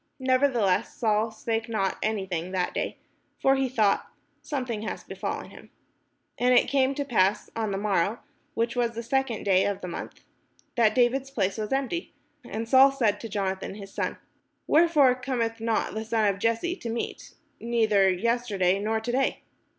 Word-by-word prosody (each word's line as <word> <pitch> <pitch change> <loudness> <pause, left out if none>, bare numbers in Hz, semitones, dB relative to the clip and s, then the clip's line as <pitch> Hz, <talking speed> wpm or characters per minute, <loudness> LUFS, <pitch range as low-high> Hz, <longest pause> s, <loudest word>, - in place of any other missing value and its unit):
Nevertheless 255 -7 +2
Saul 220 -1 +1
spake 225 +1 -3
not 195 -4 -1
any 215 -3 -1
thing 180 0 -4
that 180 -1 -1
day: - - -3 0.4
for 270 0 +4
he 270 -1 0
thought, 215 -5 +2 0.3
Something 250 -7 -3
hath 220 - -6
befallen - - -5
him. - - -14 0.7
And 250 +1 +4
it - - +5
came 270 0 +2
to 285 - -2
pass 205 -6 +1
on 220 -2 -1
the 195 - -2
morrow, 200 +1 +1 0.4
which 230 +1 0
was 235 -1 0
the 230 - -4
second 265 -2 -1
day 190 -1 +4
of 200 -1 -2
the 180 - -5
month, 170 - -7 0.5
that 220 -3 +3
David's 260 +2 +2
place 200 -6 -1
was 215 -1 -3
empty: 275 +6 -2 0.3
and 225 +1 -5
Saul 265 +3 +7
said 240 -7 +2
unto 230 - -8
Jonathan 195 -1 -3
his 195 -1 -10
son: - - -2 0.5
"Wherefore 305 -5 +5
cometh 245 -3 -2
not 225 0 -1
the 220 +1 -3
son 225 -1 +1
of 200 -1 0
Jesse 230 - 0
to 235 - -6
meat, 230 +1 -5 0.2
neither 220 -4 +3
yesterday, 200 -2 +1
nor 220 +2 0
to 240 +2 -3
day?" 265 +2 0
225 Hz, 175 wpm, -26 LUFS, 205-255 Hz, 0.7 s, Saul